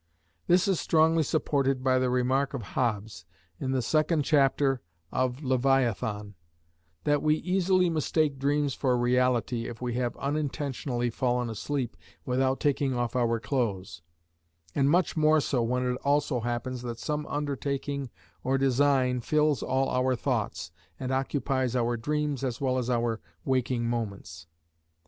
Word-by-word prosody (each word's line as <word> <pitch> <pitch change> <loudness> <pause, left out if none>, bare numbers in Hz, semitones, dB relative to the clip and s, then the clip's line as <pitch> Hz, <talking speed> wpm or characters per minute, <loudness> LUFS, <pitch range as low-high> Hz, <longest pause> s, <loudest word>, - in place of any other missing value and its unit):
This 180 +2 +4
is 190 -4 +2
strongly 160 0 +3
supported 135 -4 0
by 130 -1 +3
the 130 0 +1
remark 130 +3 +1
of 120 - -4
Hobbes 110 -7 -1 0.4
in 130 - -2
the 130 -2 0
second 155 +1 +2
chapter 135 -3 +2 0.3
of 130 +3 -1
Leviathan, 125 -5 +1 0.7
that 145 -1 +2
we 155 0 +3
easily 185 +1 +2
mistake 155 -3 0
dreams 145 0 +1
for 125 -2 +1
reality 120 -1 +1
if 115 - -8
we 125 -1 -3
have 120 0 -2
unintentionally 140 -4 -2
fallen 125 0 0
asleep 130 +3 -3 0.3
without 130 +1 +1
taking 140 -2 +1
off 120 -1 -2
our 115 -2 +1
clothes, 100 - -2 0.7
and 140 0 +2
much 175 +3 +2
more 155 0 +4
so 135 -3 0
when 125 +2 0
it 125 0 0
also 140 -1 +1
happens 120 +2 -3
that 120 -2 -5
some 150 +4 -3
undertaking 140 -1 -3 0.3
or 135 +1 +1
design 135 -1 +2
fills 150 -1 +2
all 135 +1 +1
our 130 0 +1
thoughts, 115 -9 -2 0.3
and 130 -1 -3
occupies 130 -1 0
our 120 -1 +1
dreams 145 +2 -2
as 125 -3 -2
well 130 -2 +1
as 125 0 -3
our 120 -2 0 0.2
waking 125 -2 0
moments. 100 -9 -4
130 Hz, 145 wpm, -28 LUFS, 120-145 Hz, 0.7 s, This